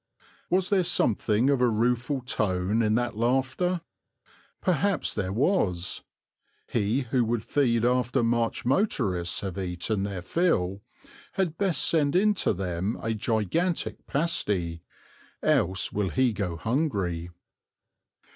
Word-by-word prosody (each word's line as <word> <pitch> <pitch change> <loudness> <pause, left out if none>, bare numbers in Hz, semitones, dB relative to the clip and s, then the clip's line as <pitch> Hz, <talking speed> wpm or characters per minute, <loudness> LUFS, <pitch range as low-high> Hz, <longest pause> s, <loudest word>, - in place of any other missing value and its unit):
Was 185 +2 +2
there 190 -2 +4
something 120 - +2
of 135 -3 +1
a 125 - +4
rueful 125 +5 0
tone 105 -3 0
in 110 -1 +2
that 120 -1 -1
laughter? 135 +10 0 0.8
Perhaps 185 +2 0
there 95 -3 -2
was. 100 - 0 0.7
He 115 +4 0
who 125 0 0
would 115 -1 -1
feed 120 -5 +1
after 125 -1 +1
March 115 0 0
motorists 110 - 0
have 95 -1 -4
eaten 95 +3 -2
their 100 -3 -4
fill 100 - 0 0.5
had 180 -5 -1
best 175 -6 +2
send 150 -2 +2
in 210 +3 +4
to 200 - 0
them 95 +2 -2
a 115 - -2
gigantic 115 - -1
pasty, 105 - 0 0.6
else 95 +2 +2
will 100 -2 0
he 130 0 +2
go 95 -4 -3
hungry. 100 - -1
115 Hz, 125 wpm, -27 LUFS, 100-145 Hz, 0.8 s, there